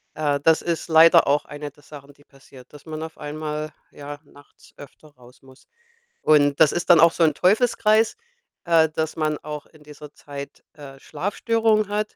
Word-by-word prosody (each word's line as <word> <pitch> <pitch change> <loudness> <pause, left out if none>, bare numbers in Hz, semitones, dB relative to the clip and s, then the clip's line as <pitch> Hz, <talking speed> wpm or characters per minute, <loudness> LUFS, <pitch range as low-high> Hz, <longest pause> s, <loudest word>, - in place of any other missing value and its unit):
Äh, 145 -2 -1
das 160 0 +3
ist 170 -2 -3
leider 165 +1 +5
auch 145 +1 +1
eine 145 0 -8
der 145 - -25
Sachen, 145 -1 -14
die 145 - -25
passiert, 135 -3 -19
dass 145 - -15
man 155 -1 -7
auf 160 0 -10
einmal, 150 0 -6 0.2
ja, 145 0 -9
nachts 145 -1 -21
öfter 145 +2 -15
raus 125 -3 -21
muss. 130 0 -20 0.5
Und 145 -2 +3
das 155 -2 +5
ist 175 - -4
dann 170 - +6
auch 165 +1 +6
so 170 - 0
'n 155 -2 +3
Teufelskreis, 215 - +2 0.5
äh, 165 -2 +3
dass 160 0 -4
man 155 -1 -2
auch 150 -1 -8
in 155 - -22
dieser 150 0 -13
Zeit, 140 -1 -11
äh, 140 -3 -13
Schlafstörungen 215 - -1
hat. 210 +1 -3
155 Hz, 185 wpm, -22 LUFS, 145-165 Hz, 0.5 s, dann